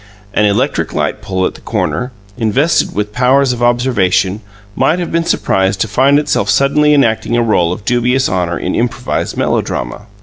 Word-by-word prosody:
An 105 - +2
electric 110 +8 0
light - - -2
pole 95 -1 -2
at - - -2
the - - -15
corner, 125 +1 -2 0.2
invested 130 +8 +1
with 105 +1 -2
powers 130 +2 +2
of 120 - -6
observation, 110 -5 +1 0.3
might 165 - +2
have 175 -1 -4
been 165 0 +1
surprised 95 - 0
to - - +1
find 135 +7 +3
itself 145 -9 0
suddenly 150 +6 +3
enacting 120 -3 +1
a 120 - +2
role 90 -7 +1
of 95 +2 -6
dubious 125 +3 +1
honour 90 -2 -1
in 90 - -3
improvised 120 +1 -2
melodrama. 60 - -2
120 Hz, 170 wpm, -14 LUFS, 100-135 Hz, 0.3 s, find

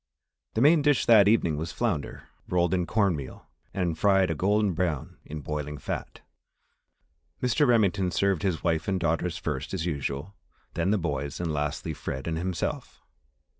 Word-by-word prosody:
The 110 - +1
main 150 +3 +6
dish 145 -2 +3
that 105 -4 +7
evening 95 -8 +3
was 80 +2 -4
flounder, 70 -3 -2 0.3
rolled 90 -1 +2
in 90 -2 0
cornmeal 90 - -1 0.3
and 90 -4 -1
fried 95 0 +3
a - - +1
golden 100 +4 +1
brown 85 -5 -2
in 75 0 -6
boiling 75 0 -4
fat. 65 - -5 1.2
Mr. 125 +4 +2
Remington 100 -5 +3
served 95 -2 +1
his 95 -5 -1
wife 80 -1 0
and 95 -2 0
daughters 85 +1 0
first - - -3
as 80 - -2
usual, 70 +2 -3 0.4
then 85 +2 0
the 105 - +3
younger 90 - -5
boys, 70 0 -3
and 85 -3 -2
lastly, 75 +2 -2
Fred 65 -2 -5
and 80 -1 -1
himself. 90 0 -3
85 Hz, 165 wpm, -27 LUFS, 75-100 Hz, 1.2 s, that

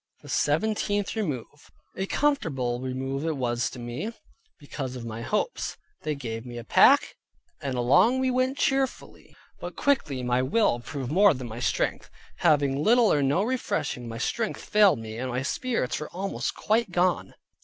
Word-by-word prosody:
THE - - -12
SEVENTEENTH 205 +6 0
REMOVE 150 - -4 0.2
A 190 - -2
comfortable 140 - 0
remove 135 +2 -3
it 160 -2 -1
was 120 -2 0
to - - -10
me, 120 - -4 0.5
because 135 -3 -6
of 120 -2 -7
my 115 0 -6
hopes. 210 - -2 0.2
They 150 - -2
gave 115 -4 -5
me 120 -1 -8
a 120 - -6
pack, - - +5 0.5
and 135 -2 -3
along 180 - +4
we 260 0 +1
went 255 +2 +1
cheerfully; 270 -1 -1 0.2
but - - -7
quickly 155 - 0
my 125 +1 +1
will 130 - +2
proved 135 +1 -5
more 195 0 +5
than 125 -1 -6
my 115 +1 -7
strength; - - -1 0.3
having 145 -4 +2
little 235 +1 +5
or 145 - +2
no 140 +8 +2
refreshing, 225 - -2
my 115 - -6
strength 220 - -2
failed 210 -6 +5
me, 110 0 -7
and 130 +1 -3
my 125 +1 -2
spirits 225 - -1
were 150 - -6
almost 195 +2 -3
quite 220 0 +1
gone. 180 0 0
145 Hz, 165 wpm, -26 LUFS, 125-210 Hz, 0.5 s, pack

